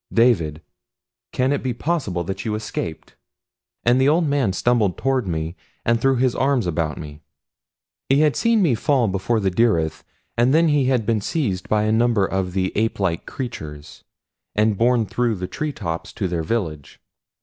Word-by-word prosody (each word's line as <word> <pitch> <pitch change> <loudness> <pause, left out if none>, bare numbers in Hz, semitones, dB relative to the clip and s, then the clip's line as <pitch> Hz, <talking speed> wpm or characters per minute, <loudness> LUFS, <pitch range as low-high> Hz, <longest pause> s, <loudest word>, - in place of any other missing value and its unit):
"David! 85 -11 +2 0.7
Can 130 +1 +1
it 145 - -1
be 125 -3 -2
possible 125 - -1
that 95 +3 -5
you 110 -2 -2
escaped?" 95 -6 -5 0.7
And 120 +2 +3
the 135 - +4
old 165 +3 +3
man 140 -8 +1
stumbled 105 -1 +1
toward 130 -5 0
me 80 0 -3 0.3
and 120 0 +2
threw 135 +1 +3
his 125 0 +2
arms 135 -5 +1
about 80 -3 -1
me. 75 -1 -9 0.9
He 135 +2 +4
had 150 -2 +3
seen 230 -3 +3
me 155 -8 +3
fall 125 +1 +2
before 100 +4 0
the 95 -2 0
dyryth, 90 -7 +1 0.3
and 120 +4 +3
then 165 0 +4
he 145 -3 +3
had 125 -4 +1
been 110 -1 +1
seized 100 - -2
by 105 0 +2
a 110 - +1
number 115 -3 +3
of 95 -1 -2
the 95 -1 0
ape 110 +1 0 0.3
creatures 80 - -7 0.5
and 105 0 +2
borne 120 +2 +2
through 115 +3 0
the 90 -1 -4
tree 150 +11 -3
tops 85 -10 -5
to 95 - -2
their 85 -2 -2
village. 80 -6 -3
115 Hz, 175 wpm, -22 LUFS, 90-130 Hz, 0.9 s, the